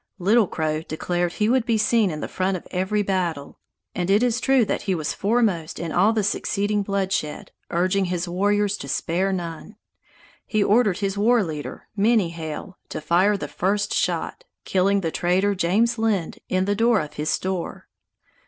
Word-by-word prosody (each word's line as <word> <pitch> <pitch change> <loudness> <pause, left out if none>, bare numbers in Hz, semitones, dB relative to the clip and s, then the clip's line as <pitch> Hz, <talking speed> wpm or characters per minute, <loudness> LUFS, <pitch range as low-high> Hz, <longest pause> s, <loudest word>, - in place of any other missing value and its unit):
Little 205 +3 +3
Crow 155 -2 -2
declared 175 +2 -2
he 210 - 0
would 250 +1 +3
be 230 -2 +1
seen 215 -1 +3
in 155 -2 -5
the - - -3
front 185 0 -1
of - - -13
every 190 +3 0
battle, 175 -7 -2 0.3
and 180 0 -2
it 205 +4 +4
is 245 -1 +1
true 265 -3 +4
that - - -2
he 190 -3 -1
was 155 -3 -2
foremost 200 -7 0
in 165 -2 -4
all 195 +7 +4
the 220 -2 0
succeeding 205 +1 0
bloodshed, 195 -6 -2 0.2
urging 185 +3 +1
his 180 0 -2
warriors 205 +3 +1
to - - -8
spare 180 +7 0
none. 175 +3 -5 0.7
He 215 -2 +1
ordered 210 -3 +3
his 200 0 -2
war 230 +1 +4
leader, 155 -4 -6
Many 210 -4 +2
Hail, 165 +3 -7
to - - -4
fire 180 +7 +2
the 145 - -5
first 200 +7 -1
shot, - - -1 0.2
killing 195 +1 +2
the 165 -3 -2
trader 185 +5 +1
James 210 +6 +1
Lynd, 210 -7 0
in 185 0 +1
the 205 - +1
door 225 +1 +3
of 150 - -5
his 150 +1 -3
store. 185 -2 -3
195 Hz, 180 wpm, -23 LUFS, 175-210 Hz, 0.7 s, it